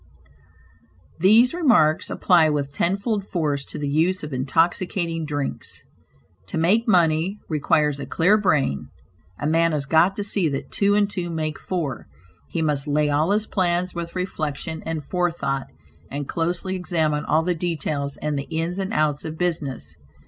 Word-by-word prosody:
These 220 Hz, -, +5 dB
remarks 220 Hz, -, +3 dB
apply 170 Hz, -4 st, +4 dB
with 140 Hz, -2 st, -2 dB
tenfold 200 Hz, +6 st, 0 dB
force 150 Hz, -7 st, -1 dB
to -, -, -5 dB
the 145 Hz, -, -3 dB
use 165 Hz, +6 st, +1 dB
of 150 Hz, -2 st, -6 dB
intoxicating 165 Hz, +4 st, 0 dB
drinks. 145 Hz, -2 st, -4 dB, 0.6 s
To -, -, -4 dB
make 205 Hz, +9 st, +2 dB
money, 175 Hz, 0 st, +3 dB
requires 150 Hz, -1 st, +1 dB
a 140 Hz, -, -6 dB
clear 180 Hz, +6 st, +3 dB
brain. 150 Hz, -, +1 dB, 0.5 s
A -, -, -4 dB
man 165 Hz, +1 st, +2 dB
has 145 Hz, -2 st, -1 dB
got 165 Hz, +6 st, +3 dB
to 205 Hz, -, -3 dB
see 200 Hz, -5 st, +1 dB
that 135 Hz, -1 st, -5 dB
two 200 Hz, 0 st, +2 dB
and 205 Hz, -1 st, +3 dB
two 180 Hz, -4 st, -4 dB
make 155 Hz, -2 st, -3 dB
four; 160 Hz, -9 st, -4 dB, 0.4 s
he 165 Hz, -, -1 dB
must 150 Hz, -2 st, 0 dB
lay 150 Hz, 0 st, +1 dB
all 150 Hz, +4 st, +2 dB
his 210 Hz, +1 st, +1 dB
plans 180 Hz, -2 st, 0 dB
with 170 Hz, 0 st, -6 dB
reflection 160 Hz, -3 st, -3 dB
and 160 Hz, -2 st, -3 dB
forethought, 170 Hz, -5 st, -1 dB, 0.4 s
and 145 Hz, 0 st, -4 dB
closely 175 Hz, +3 st, -2 dB
examine 160 Hz, -5 st, 0 dB
all 155 Hz, +2 st, +2 dB
the 180 Hz, +1 st, +1 dB
details 155 Hz, -4 st, -2 dB
and 150 Hz, -2 st, -2 dB
the 140 Hz, -, -6 dB
ins 165 Hz, +3 st, -2 dB
and 190 Hz, 0 st, -2 dB
outs 150 Hz, -1 st, +1 dB
of 160 Hz, 0 st, -6 dB
business. 160 Hz, -6 st, -3 dB
165 Hz, 160 wpm, -23 LUFS, 150-180 Hz, 0.6 s, These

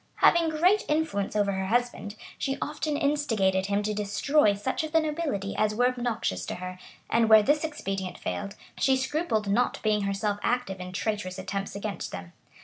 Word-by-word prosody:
Having 335 Hz, -1 st, +4 dB
great 355 Hz, +7 st, +3 dB
influence 300 Hz, -11 st, 0 dB
over 205 Hz, -1 st, +2 dB
her 190 Hz, 0 st, -2 dB
husband, 240 Hz, -2 st, -1 dB, 0.2 s
she 270 Hz, -1 st, -1 dB
often 300 Hz, 0 st, -2 dB
instigated 225 Hz, -11 st, +1 dB
him 200 Hz, +1 st, 0 dB
to 210 Hz, +1 st, -1 dB
destroy 210 Hz, +3 st, +2 dB
such 260 Hz, +9 st, -2 dB
of 315 Hz, 0 st, -5 dB
the 325 Hz, -, +6 dB
nobility 300 Hz, -, -2 dB
as 215 Hz, 0 st, +1 dB
were 245 Hz, +2 st, +4 dB
obnoxious 240 Hz, -, -2 dB
to -, -, -3 dB
her; 185 Hz, 0 st, -7 dB, 0.3 s
and 230 Hz, -1 st, +2 dB
where 220 Hz, -1 st, +8 dB
this 295 Hz, +6 st, +2 dB
expedient 195 Hz, -, -4 dB
failed, 200 Hz, 0 st, -4 dB, 0.2 s
she 265 Hz, -1 st, +3 dB
scrupled 260 Hz, -5 st, -1 dB
not 230 Hz, +5 st, +1 dB
being 215 Hz, -1 st, +2 dB
herself 200 Hz, +1 st, -1 dB
active 240 Hz, -6 st, -1 dB
in 180 Hz, 0 st, -6 dB
traitorous 185 Hz, -1 st, -2 dB
attempts 195 Hz, +1 st, -4 dB
against 200 Hz, 0 st, -4 dB
them. 90 Hz, -1 st, -8 dB
215 Hz, 175 wpm, -27 LUFS, 200-285 Hz, 0.3 s, where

